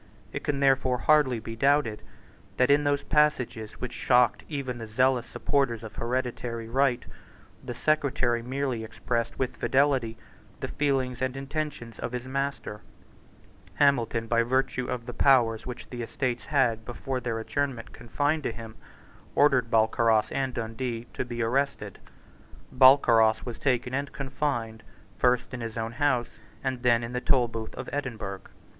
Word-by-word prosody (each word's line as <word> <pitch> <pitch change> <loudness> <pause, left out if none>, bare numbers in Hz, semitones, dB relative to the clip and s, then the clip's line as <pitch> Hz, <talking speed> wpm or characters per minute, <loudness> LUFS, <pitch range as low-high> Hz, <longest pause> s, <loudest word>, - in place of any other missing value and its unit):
It - - -4
can 140 -1 -1
therefore 135 -2 +3
hardly 140 -3 +3
be 115 +1 -7
doubted 135 -3 +2 0.6
that, 125 +2 +4
in 145 +1 +4
those 145 0 +1
passages 125 -7 +1
which 125 - -6
shocked 125 -2 +3
even 135 -5 -4
the 115 - -6
zealous 125 +2 +2
supporters 130 -6 0
of 110 - -9
hereditary 120 -1 -3
right, 125 +1 +1 0.6
the 120 - -6
Secretary 130 -4 +1
merely 130 -1 -2
expressed 115 +1 -3
with 130 -1 -2
fidelity 130 -5 +1 0.4
the - - -4
feelings 130 -4 -1
and 130 0 -1
intentions 135 -4 -5
of 125 - -4
his 125 0 -4
master, 135 -5 -3 0.9
Hamilton, 120 -5 +2
by 115 0 +2
virtue 130 +1 0
of 125 -2 -3
the 125 - -6
powers 120 -5 +3
which 125 - -7
the 120 -1 -5
Estates 120 +1 -3
had, 120 -6 +1
before 130 +2 -4
their 115 -2 -3
adjournment, 125 +1 -3
confided 145 +7 -1
to 135 - -2
him, 115 -1 -10 0.6
ordered 130 -5 +4
Balcarras 110 0 +3
and 135 -1 -1
Dundee 115 +1 -4
to - - -2
be 120 -1 -3
arrested. 135 +5 -1 0.8
Balcarras 120 -4 +6
was 120 -2 -6
taken 125 -2 0
and 140 +1 -2
confined, 130 -5 -3 0.4
first 125 0 +2
in 125 - -5
his 115 -1 -5
own 115 0 -2
house, 125 -1 0 0.2
and 130 -2 -2
then 120 -1 +3
in 115 +1 -5
the 125 - -2
Tolbooth 115 -5 0
of - - -6
Edinburgh. 110 -9 -4
125 Hz, 150 wpm, -27 LUFS, 115-135 Hz, 0.9 s, Balcarras